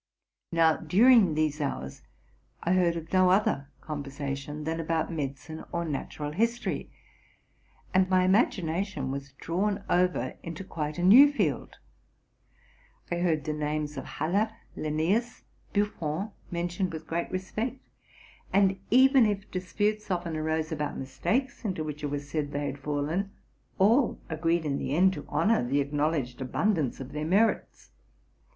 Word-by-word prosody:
Now, 165 -1 +4
during 195 +1 +5
these 155 -1 0
hours, 70 - -4 0.6
I 175 - +2
heard 170 -3 +1
no 185 -1 +5
other 185 -7 +2 0.2
conver 145 -2 -5
sation 140 +2 -5
than 165 +1 -2
about 165 0 -1
mediciné 145 0 -5
or 170 0 -1
natural 145 0 -4
history, 230 +8 -1 1.0
and 185 0 +3
my 185 -1 +4
imagi 195 -1 +3
nation 160 -4 -2
was 140 0 -6
drawn 195 +8 -1
over 180 0 +1
into 170 +2 -6
quite 155 -4 -4
a 175 - -2
new 260 +10 +9
field. 290 - -1 1.3
I 175 - 0
heard 165 -4 +1
the 155 0 -2
names 150 0 -2
of 135 - -5
Haller, 200 +8 0 0.2
Linnzus, 170 +11 -1 0.3
Buffon, 200 -2 -1 0.2
mentioned 175 +1 -2
with 160 - -6
great 170 +1 -2
respect; 215 +7 -3 0.7
and, 195 -1 +3
even 260 -1 +6
if 205 -1 -3
disputes 205 +3 -1
often 175 -3 -2
arose 160 0 -1
about 150 -2 -3
mistakes 255 - -2
into 185 -7 -2
which 150 -1 -6
it 145 - -1
was 145 0 -4
said 145 -1 -2
they 145 0 -1
had 140 0 -4
fallen, 150 +7 -1 0.5
all 230 +7 +4
agreed 165 +1 0
in 140 -2 -1
the 140 - -2
end 190 +3 +5
to 150 - -8
honor 225 - +2
the 135 +4 +1
acknowledged 145 -3 -1
abundance 155 - 0
of 135 0 -7
their 150 0 -3
merits. 200 +8 +1
165 Hz, 145 wpm, -28 LUFS, 150-195 Hz, 1.3 s, new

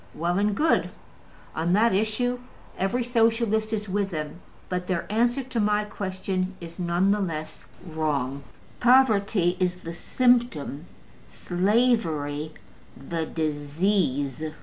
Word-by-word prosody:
Well 175 +3 0
and 205 0 +1
good! 320 +1 +2 0.7
On 165 +2 +1
that 225 +3 +4
issue 220 +5 0 0.4
every 200 +6 0
Socialist 225 -2 +1
is 210 -1 -2
with 200 +1 -1
them. 155 -1 -5 0.3
But 180 0 -3
their 175 -3 -1
answer 240 +5 +2
to 255 -2 -3
my 210 0 +2
question 190 -2 -3
is 170 +1 -10
none 175 +2 +2
the 210 - +2
less 155 -4 -5 0.2
wrong. 145 -5 -2 0.4
Poverty 215 -8 +4
is 180 -1 +1
the 165 - -5
symptom: 235 - +1 0.4
slavery 175 - 0 0.5
the 160 +4 -4
disease. 150 -2 0
190 Hz, 120 wpm, -26 LUFS, 160-220 Hz, 0.7 s, that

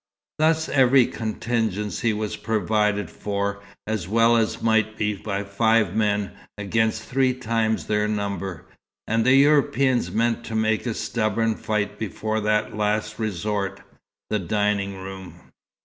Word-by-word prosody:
Thus 160 +1 +2
every 130 -2 +5
contingency 110 -1 -2
was 105 0 -3
provided 105 -2 0
for, 100 0 -3 0.2
as 110 -5 -3
well 115 +3 +4
as 115 -2 +1
might 110 -1 +1
be 105 0 0
by 100 0 -3
five 105 -1 +2
men, 105 -2 +1 0.3
against 110 +2 0
three 130 0 +1
times 115 -3 -1
their 105 0 +1
number; 100 -5 -3 0.4
and 115 +1 +1
the 130 +3 +5
Europeans 135 - +3
meant 115 +4 0
to 115 - -5
make 110 +2 +1
a 115 - -2
stubborn 115 -1 0
fight 105 -1 -2
before 110 +1 -2
that 105 0 0
last 105 0 -1
resort 100 -1 -2 0.5
the 105 - +1
dining 100 +1 -1
room. 95 -2 -10
110 Hz, 135 wpm, -24 LUFS, 100-115 Hz, 0.5 s, every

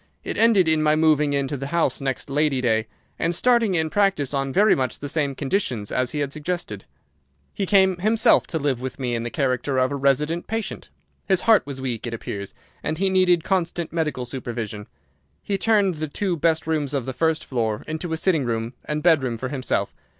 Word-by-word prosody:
It - - -4
ended 220 -6 +4
in 160 -1 +3
my 155 0 +3
moving 155 -2 +3
into 140 0 -1
the 135 0 -5
house 170 -1 0
next 135 -1 -3
Lady 145 -1 +1
Day, 110 -3 +1 0.3
and 170 +1 0
starting 235 -2 +3
in 160 -2 0
practice 195 -9 +1
on 135 -1 -1
very 205 +6 +4
much 130 -1 -1
the 145 - -6
same 140 -2 -1
conditions 130 - -2
as 125 -1 0
he 150 - -3
had 140 -1 -2
suggested. 155 - -4 0.7
He 195 - -2
came 190 -2 +4
himself 215 +5 +3
to 165 - -2
live 140 -5 -1
with 130 -1 -5
me 125 -3 -2
in 115 - -1
the 120 - -3
character 130 0 -1
of 130 +1 +2
a - - -1
resident 145 +5 0
patient. 225 -1 -4 0.4
His 190 -2 +2
heart 220 -9 +4
was 140 -2 -6
weak, 125 -3 -3
it 115 - -3
appears, 100 -3 -7 0.3
and 155 - -2
he 190 +2 +1
needed 180 -3 +3
constant 170 -3 -1
medical 155 -7 -1
supervision. 115 -4 -5 0.6
He 195 -1 -2
turned 205 -3 +3
the 155 -1 -4
two 185 +4 -2
best 160 0 +1
rooms 150 -3 -1
of 135 -4 -1
the 130 - -4
first 160 +2 0
floor 110 -4 -2
into 160 +2 -4
a 160 - 0
sitting 165 -4 +2
room 115 0 -2
and 150 0 -3
bedroom 135 -9 +3
for 130 +2 -4
himself. 130 -2 -2
150 Hz, 205 wpm, -23 LUFS, 130-175 Hz, 0.7 s, ended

